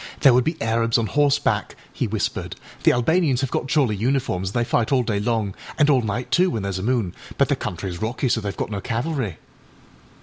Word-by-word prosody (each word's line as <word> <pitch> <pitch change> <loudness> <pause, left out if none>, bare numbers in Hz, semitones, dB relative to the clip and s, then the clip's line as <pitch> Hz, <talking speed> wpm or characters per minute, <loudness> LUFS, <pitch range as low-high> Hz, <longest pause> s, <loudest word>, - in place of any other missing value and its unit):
âThere 135 -4 +6
would 125 +1 +4
be 160 +4 -2
Arabs 115 0 +1
on 115 - +1
horseback,â 145 +4 +1 0.2
he - - -1
whispered; - - -3 0.3
âthe - - +6
Albanians 135 +1 +2
have 135 - -2
got - - -1
jolly 135 -7 +2
uniforms, 115 -5 0
and - - -10
they 120 - +2
fight 115 -1 +1
all 130 -2 +3
day 110 -3 -1
long, 105 -2 -1 0.2
and 150 0 +4
all 130 -3 +4
night, 115 +3 -3
too, 185 +1 +4
when 110 - -3
thereâs 100 -1 -2
a - - -4
moon, 110 -4 0 0.2
but - - +3
the - - +3
countryâs 90 0 -5
rocky, 115 +4 -1
so 115 -2 +1
theyâve 100 -2 -4
got - - -3
no 100 -1 -3
cavalry. 120 - -2
120 Hz, 215 wpm, -23 LUFS, 105-135 Hz, 0.3 s, âThere